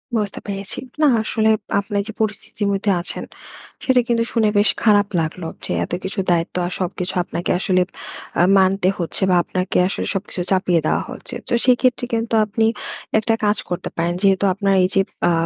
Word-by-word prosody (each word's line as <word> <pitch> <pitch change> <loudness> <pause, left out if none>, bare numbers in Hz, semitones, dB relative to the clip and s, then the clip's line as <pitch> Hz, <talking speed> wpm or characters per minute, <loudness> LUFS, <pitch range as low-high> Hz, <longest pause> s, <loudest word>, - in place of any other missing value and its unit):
বুঝতে 205 -3 -1
পেরেছি। 195 -1 -4 0.2
না 300 - +6 0.2
আসলে 220 0 +1 0.3
আপনার 200 0 -1
যে 220 - -6
পরিস্থিতির 210 -1 -2
মধ্যে 200 +1 +1
আছেন, - - -6 0.6
সেটা 255 -2 +4
কিন্তু 230 -1 +2
শুনে 220 -3 +2
বেশ 205 - +5
খারাপ 205 -2 +5
লাগলো। 165 +2 -4 0.2
যে - - -4
এতকিছু 190 +3 -4
দায়িত্ব 170 0 0
আর 180 - -3
সবকিছু 180 0 -3
আপনাকে 175 - -3
আসলে 185 -1 +2 0.5
অ্যা 175 - +4
মানতে 190 0 +3
হচ্ছে, 170 +1 -3
বা 180 - +4
আপনাকে 185 +1 -2
আসলে - - -3
সবকিছু 195 -2 -3
চাপিয়ে 185 -3 +3
দেয়া - - +1
হচ্ছে। 255 0 -7
তো - - -7
সেক্ষেত্রে 250 -1 +3
কিন্তু 225 0 -1
আপনি 220 +2 0 0.5
একটা 225 +1 +1
কাজ 210 +1 +2
করতে 175 - -3
পারেন। 170 +1 0
যেহেতু 195 0 +3
আপনার 195 0 +1
এই - - +4
যে 195 - +5 0.2
অ্যা 175 - +4
200 Hz, 175 wpm, -20 LUFS, 185-220 Hz, 0.6 s, না